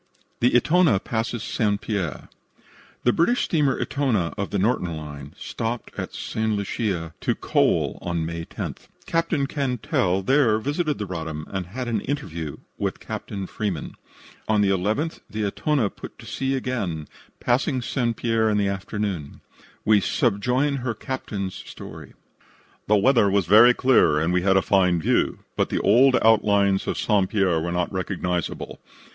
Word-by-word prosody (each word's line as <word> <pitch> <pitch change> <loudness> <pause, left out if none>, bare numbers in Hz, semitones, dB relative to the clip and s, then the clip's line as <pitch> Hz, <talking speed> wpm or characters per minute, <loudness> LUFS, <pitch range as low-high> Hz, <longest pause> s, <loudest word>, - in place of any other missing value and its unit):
THE 120 +1 +3
"ETONA" 155 - +4
PASSES 115 0 -2
ST. 105 -2 0
PIERRE 100 -8 -3 0.8
The 120 - +4
British 240 +9 +2
steamer 150 -5 +1
Etona, 120 -12 0
of 100 - -3
the 100 - -1
Norton 90 -5 0
Line, 75 0 -9
stopped 115 +2 -4
at - - -5
St. 110 0 -2
Lucia 100 -5 -2
to - - 0
coal - - +1
on 85 -2 -2
May 85 0 -4
10th. - - -7 0.2
Captain 165 -3 0
Cantell 125 - 0
there 130 -2 +4
visited 145 +6 -1
the 105 - -3
Roddam 80 -4 -5
and 95 -2 -3
had 125 +6 -5
an 110 -4 0
interview 85 - -4 0.2
with - - -2
Captain 100 -2 -5
Freeman. 95 -6 -4 0.5
On 110 -1 +3
the 100 - +3
11th 105 - -1
the 110 0 -3
Elona 115 +2 0
put - - -10
to - - -13
sea 135 0 -2
again, 100 - -3 0.3
passing 130 +2 +1
St. 120 -2 -1
Pierre 115 -2 +1
in 105 - +1
the 100 -1 +2
afternoon. 100 -5 -4 0.4
We 105 -2 +5
subjoin 125 +8 +1
her 120 -3 -3
captain's 100 -6 -4
story: 95 - -10 0.7
"The 105 - +5
weather 110 -1 +4
was 100 -1 +2 0.3
clear 125 - +4
and 80 +3 0
we 90 - +2
had 95 +1 +3
a 95 - +3
fine 90 -3 +3
view, - - +1
but - - +1
the - - 0
old 125 +6 +5
outlines 100 -3 +3
of - - -1
St. 100 -4 +2
Pierre 95 -6 +2
were 85 +2 -2
not 90 +2 -1
recognizable. 90 -2 -3
105 Hz, 155 wpm, -24 LUFS, 90-125 Hz, 0.8 s, We